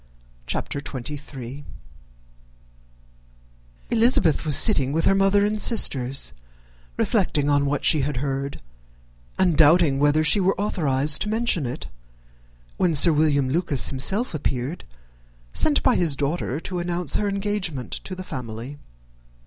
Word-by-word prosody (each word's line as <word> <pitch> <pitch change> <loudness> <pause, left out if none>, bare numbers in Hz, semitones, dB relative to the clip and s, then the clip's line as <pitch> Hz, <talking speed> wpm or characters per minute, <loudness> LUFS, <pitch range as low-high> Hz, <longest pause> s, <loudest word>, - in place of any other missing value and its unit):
_]] - - -33
CHAPTER 140 - -3
XXIII. 140 -1 -8 2.3
Elizabeth 230 - +3
was 150 - +2
sitting 140 -10 +3
with 165 +1 0
her - - +4
mother 195 +1 +3
and 210 0 -2
sisters, 135 - +1 0.6
reflecting 145 -1 0
on 145 -1 +2
what 145 0 -2
she 155 - +3
had 140 -1 -2
heard, 135 - -4 0.7
and 180 -4 +2
doubting 155 -2 +4
whether 145 +2 +3
she 180 +7 +3
was 190 0 +1
authorized 150 -7 +1
to 210 - -1
mention 215 - 0
it, 120 - -6 0.9
when 170 -3 +1
Sir 165 +3 +7
William 145 -3 +2
Lucas 145 -1 0
himself 190 - -2
appeared, 140 +1 -3 0.7
sent 295 - +2
by 255 - +3
his 160 -5 +1
daughter 145 0 -2
to 180 0 -5
announce 175 -2 -1
her 205 - -1
engagement 195 -9 -3
to 185 - -7
the 185 - -7
family. 125 -2 -7
150 Hz, 135 wpm, -23 LUFS, 140-185 Hz, 2.3 s, Sir